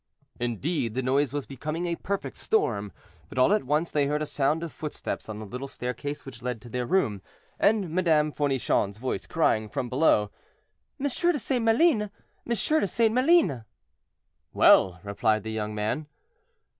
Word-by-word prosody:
Indeed, 120 - -2
the 130 - -1
noise 135 +2 +2
was 145 -1 -3
becoming 155 +6 -4
a 170 -1 -1
perfect 200 +3 -4
storm, 105 - 0 0.4
but - - -10
all 130 +10 +5
at 210 - +1
once 150 +5 0
they 145 -2 +2
heard 150 +1 0
a - - -2
sound 150 +3 0
of 165 - -6
footsteps 150 -6 -5
on 110 - -5
the 110 - -7
little 125 +6 -6
staircase 130 +3 -5
which 125 -3 -10
led 125 -2 -3
to 120 - -11
their 125 +1 -3
room, 115 - +1 0.4
and 205 -3 +3
Madame 160 -4 +2
Fournichon's 135 -8 0
voice, 130 +3 -3
crying, 110 -9 +1
from 125 - -3
below, 125 -7 +3 0.7
"M. - - -6
de 340 +4 +1
St. 255 -2 -1
Maline, 230 +3 +4
M. 210 - -4 0.4
de 235 +3 +1
St. 225 +3 +2
Maline!" 255 - +3 0.9
"Well!" 90 -1 +5
replied 110 +2 0
the 110 - -5
young 105 -1 -3
man. 110 +9 -2
145 Hz, 170 wpm, -27 LUFS, 120-185 Hz, 0.9 s, all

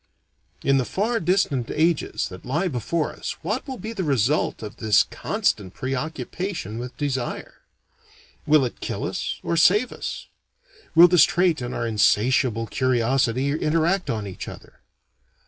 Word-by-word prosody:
In 135 0 +3
the - - +1
far 225 - -1
distant 165 - +1
ages 160 0 0
that 90 0 -11
lie 155 +9 -1
before 150 +3 -2
us - - -5
what 210 - -2
will 260 -2 -5
be 220 0 -6
the 195 -4 -3
result 140 -3 +1
of 105 - -8
this 110 -2 +4
constant 95 -3 -2
preoccupation 135 - -4
with 125 +1 -7
desire? 135 -4 -4 0.9
Will 150 -3 +5
it 120 - -6
kill - - -4
us - - -3
or 170 - -1
save 205 +8 +4
us? - - -6 0.7
Will 170 +2 +10
this 175 -3 +6
trait 175 -4 +2
and 120 0 -4
our - - -2
insatiable 115 +2 +2
curiosity 130 +2 +1
interact 165 +3 +1
on 110 -4 -2
each 95 -2 -7
other? - - -11
140 Hz, 145 wpm, -23 LUFS, 120-175 Hz, 0.9 s, Will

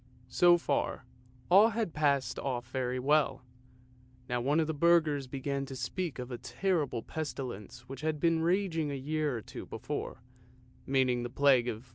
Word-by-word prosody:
So 175 +6 +5
far, - - -2 0.5
all 205 +5 +8
had 220 -6 -2
passed 140 -4 +1
off 120 -3 -4
very 130 -1 -1
well. 135 -1 +1 0.8
Now 125 0 -1
one 145 +6 +2
of 160 - +2
the 160 - -2
burghers 155 -3 +3
began 140 +1 -3
to 135 - -7
speak 150 +5 -3
of 125 0 -6
a 120 - -5
terrible 140 -1 -1
pestilence 125 -7 -6
which 130 +2 -9
had 155 -1 -1
been 165 0 +2
raging 170 -3 +1
a 140 - -3
year 145 0 -1
or - - -6
two - - -9
before, - - -5 0.6
meaning 130 -2 +2
the 120 - -4
plague 130 -2 +4
of 115 -1 -4
1484. - - -24
140 Hz, 170 wpm, -31 LUFS, 125-160 Hz, 0.8 s, all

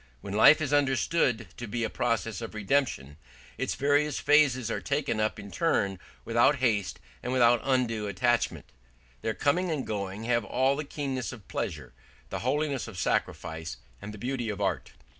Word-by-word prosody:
When 100 - -6
life 145 +9 +7
is 145 -2 -1
understood 130 - +2
to 120 - -6
be 115 +3 -2
a - - 0
process 115 -1 -1
of 115 -1 -7
redemption, 105 - 0 0.4
its 130 - -1
various 145 +1 +2
phases 140 -5 +3
are - - -2
taken 140 -5 -1
up 110 0 0
in 100 0 -9
turn 100 - 0 0.3
without 120 +5 +4
haste 110 -8 0 0.2
and 125 - -3
without 120 -2 +4
undue 120 -5 0
attachment; 120 +5 0 0.5
their 110 - -2
coming 175 +6 +1
and 150 -5 -2
going 100 0 -4
have 115 0 +1
all 130 +6 +1
the 150 +1 -4
keenness 135 -6 -3
of 110 -5 -12
pleasure, - - -4 0.4
the - - -2
holiness 140 0 -1
of 110 -4 -9
sacrifice, 80 -5 -2 0.2
and 105 - -7
the 105 - -9
beauty 120 0 -3
of 105 - -4
art. - - -2
120 Hz, 170 wpm, -28 LUFS, 105-140 Hz, 0.5 s, life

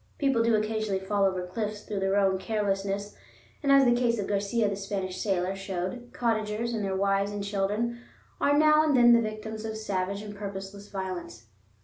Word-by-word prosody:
People 270 -5 +2
do 230 -1 +3
occasionally 215 -2 0
fall 200 +1 +1
over 185 -2 0
cliffs 210 +3 -4
through 205 -2 -4
their 195 0 +1
own 190 -2 +3
carelessness, 200 0 -2 0.5
and 280 -2 +2
as 275 -1 +7
the 240 - +5
case 240 -1 +2
of 205 - -2
Garcia, 205 +3 0
the 200 - -1
Spanish 195 -2 -4
sailor, 190 -2 0
showed, 195 +5 -4
cottagers 225 0 -1
and 220 -2 -2
their 195 -1 -1
wives 195 +1 +1
and 205 -1 -4
children 205 +4 -1 0.4
are 285 0 +3
now 305 0 +6
and 295 -4 +3
then 240 -1 +7
the 235 - +5
victims 215 0 -5
of 220 0 -4
savage 200 -1 -2
and 205 -1 -8
purposeless 200 0 -7
violence. 185 - -6
205 Hz, 190 wpm, -28 LUFS, 195-225 Hz, 0.5 s, as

